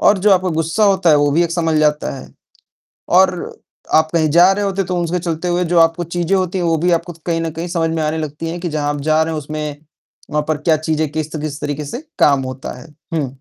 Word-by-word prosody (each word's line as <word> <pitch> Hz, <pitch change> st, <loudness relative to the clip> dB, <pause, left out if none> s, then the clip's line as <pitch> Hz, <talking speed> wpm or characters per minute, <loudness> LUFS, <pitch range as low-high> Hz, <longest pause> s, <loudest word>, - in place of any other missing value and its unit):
और 205 Hz, -, +4 dB
जो 205 Hz, +2 st, +3 dB
आपका 185 Hz, 0 st, +2 dB
गुस्सा 165 Hz, +7 st, +1 dB
होता 190 Hz, -4 st, +3 dB
है 150 Hz, -, +6 dB
वो 145 Hz, 0 st, +2 dB
भी 170 Hz, +3 st, +3 dB
एक 170 Hz, -, -3 dB
संभल 165 Hz, -2 st, +1 dB
जाता 150 Hz, 0 st, +1 dB
है। -, -, -11 dB, 0.9 s
और 190 Hz, -1 st, +5 dB
अ, -, -, -4 dB
आप 160 Hz, 0 st, +2 dB
कहीं 160 Hz, -2 st, +2 dB
जा 175 Hz, +3 st, +6 dB
रहे 205 Hz, +1 st, -1 dB
होते 195 Hz, 0 st, -1 dB
तो 180 Hz, 0 st, -3 dB
उसके 175 Hz, +2 st, -1 dB
चलते 165 Hz, 0 st, -3 dB
हुए 175 Hz, +1 st, +1 dB
जो 170 Hz, -, +5 dB
आपको 165 Hz, +1 st, +3 dB
चीज़ें 175 Hz, +2 st, +1 dB
होती 185 Hz, 0 st, -1 dB
हैं 180 Hz, -, -1 dB
वो 165 Hz, -1 st, +2 dB
भी 175 Hz, +3 st, +1 dB
आपको 175 Hz, 0 st, -10 dB
कहीं 165 Hz, -1 st, 0 dB
न 165 Hz, -, -2 dB
कहीं 165 Hz, +3 st, -5 dB
समझ 170 Hz, -2 st, 0 dB
में 160 Hz, -, -1 dB
आने 155 Hz, +1 st, -1 dB
लगती 155 Hz, +1 st, -4 dB
हैं 175 Hz, +1 st, -5 dB
कि 175 Hz, -, -3 dB
जहाँ 145 Hz, -1 st, -1 dB
आप 145 Hz, -, -5 dB
जा 155 Hz, +1 st, +4 dB
रहे 160 Hz, -, -3 dB
हैं 155 Hz, -, -3 dB
उसमें 150 Hz, 0 st, -5 dB, 0.5 s
वहाँ 150 Hz, 0 st, 0 dB
पर 155 Hz, -1 st, 0 dB
क्या 155 Hz, +1 st, +2 dB
चीज़ें 155 Hz, -1 st, -1 dB
किस 155 Hz, 0 st, -4 dB
त 150 Hz, -, -4 dB
किस 150 Hz, -1 st, -5 dB
तरीके 145 Hz, 0 st, -3 dB
से 240 Hz, -, -5 dB, 0.2 s
काम 140 Hz, -2 st, +4 dB
होता 130 Hz, +1 st, -6 dB
है। -, -, -13 dB, 0.3 s
हुँ। 150 Hz, -4 st, 0 dB
165 Hz, 265 wpm, -18 LUFS, 150-175 Hz, 0.9 s, है